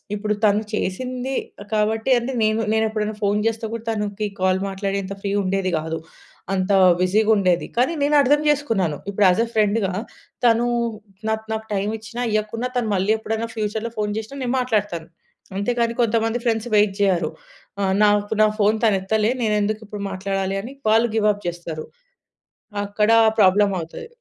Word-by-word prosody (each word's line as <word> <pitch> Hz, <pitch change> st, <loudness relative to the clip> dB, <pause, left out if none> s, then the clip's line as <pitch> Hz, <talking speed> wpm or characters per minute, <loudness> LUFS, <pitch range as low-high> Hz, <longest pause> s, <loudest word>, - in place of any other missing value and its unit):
ఇప్పుడు 210 Hz, 0 st, -1 dB
తను 210 Hz, 0 st, +4 dB
చేసింది 250 Hz, +6 st, -3 dB, 0.4 s
కాబట్టి 220 Hz, +3 st, +1 dB
అంటే 240 Hz, +3 st, -4 dB
నేను 220 Hz, 0 st, +1 dB
ఎప్పుడైనా 215 Hz, 0 st, -2 dB
ఫోన్ 205 Hz, +1 st, +2 dB
జేస్తే 225 Hz, 0 st, -1 dB
కూడా 230 Hz, -, -5 dB
తనకి 210 Hz, -1 st, -2 dB
కాల్ 185 Hz, 0 st, +2 dB
మాట్లాడేంత 195 Hz, 0 st, -3 dB
ఫ్రీ 200 Hz, -, -2 dB
ఉండేది 190 Hz, 0 st, 0 dB
గాదు. 160 Hz, +1 st, -3 dB, 0.5 s
అంత 190 Hz, +1 st, 0 dB, 0.3 s
బిజీగా 210 Hz, +4 st, +3 dB
ఉండేది. 185 Hz, -4 st, +2 dB
కానీ 255 Hz, +7 st, +3 dB
నేను 295 Hz, +1 st, +3 dB
అర్థం 290 Hz, +3 st, +3 dB
జేసుకున్నాను. 225 Hz, -, +1 dB
ఇప్పుడు 200 Hz, 0 st, +2 dB
యాజ్ 185 Hz, +4 st, +3 dB
ఎ -, -, -9 dB
ఫ్రెండ్‌గా 210 Hz, -2 st, +2 dB, 0.5 s
తను 235 Hz, 0 st, +4 dB, 0.6 s
నాకు, 220 Hz, 0 st, -1 dB
నాకు 220 Hz, 0 st, -4 dB
టైమ్ 200 Hz, +1 st, 0 dB
ఇచ్చినా 235 Hz, +2 st, -5 dB
ఇయ్యకున్నా 215 Hz, +3 st, -1 dB
తను 225 Hz, -3 st, 0 dB
మళ్ళీ 195 Hz, +3 st, +1 dB
ఎప్పుడైనా 220 Hz, +1 st, -3 dB
ఫ్యూచర్‌లో 220 Hz, +1 st, -2 dB
ఫోన్ 210 Hz, -1 st, -1 dB
జేసినా 225 Hz, +6 st, -6 dB
నేను 245 Hz, -, -1 dB
మాట్లాడతాను. 205 Hz, -9 st, -1 dB, 0.5 s
అంతే 205 Hz, +5 st, 0 dB
కానీ 230 Hz, 0 st, +1 dB
కొంతమంది 225 Hz, +1 st, +1 dB
ఫ్రెండ్స్ 225 Hz, 0 st, 0 dB
వెయిట్ 205 Hz, -2 st, +3 dB
జెయ్యరు. 175 Hz, -5 st, +2 dB, 0.5 s
ఆహ్, 190 Hz, -1 st, +1 dB
నాకు 205 Hz, +1 st, +2 dB
నా -, -, +6 dB
ఫోన్ 210 Hz, +2 st, +4 dB
తను 210 Hz, -3 st, +4 dB
ఎత్తలే, 215 Hz, +4 st, +1 dB
నేనేందుకు 210 Hz, 0 st, 0 dB
ఇప్పుడు 210 Hz, -1 st, -6 dB
మాట్లాడాలి 195 Hz, 0 st, -2 dB
అని 250 Hz, +5 st, -8 dB, 0.2 s
వాళ్ళు 225 Hz, +2 st, +4 dB
గివ్ 215 Hz, -1 st, +2 dB
అప్ 205 Hz, -1 st, -13 dB
జేస్తారు. 170 Hz, -2 st, -5 dB, 1.0 s
అక్కడ 210 Hz, +2 st, +1 dB, 0.3 s
ప్రాబ్లమ్ 200 Hz, +1 st, +5 dB
అవుతది. 165 Hz, -, -8 dB
210 Hz, 160 wpm, -22 LUFS, 195-225 Hz, 1.0 s, నా